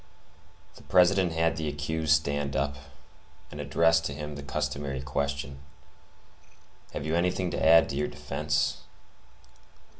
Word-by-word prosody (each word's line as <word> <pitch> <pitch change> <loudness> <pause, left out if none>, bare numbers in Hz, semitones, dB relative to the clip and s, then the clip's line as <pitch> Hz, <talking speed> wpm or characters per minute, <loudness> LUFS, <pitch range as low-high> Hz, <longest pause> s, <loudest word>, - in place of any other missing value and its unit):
The - - -14
President 90 -1 +3
had 80 0 +1
the 80 -1 -2
accused 75 +1 0
stand 70 -2 -2
up, 70 +1 0 0.8
and 75 - -6
addressed 80 +3 +3
to 70 - -3
him 75 0 -6
the 70 - -7
customary 70 -1 -3
question, 70 +1 -3 1.3
"Have 70 - -4
you 80 +1 0
anything 90 +1 0
to - - -2
add 80 +1 +7
to - - -4
your 75 +1 0
defence?" 75 +1 -1
75 Hz, 130 wpm, -28 LUFS, 70-80 Hz, 1.3 s, add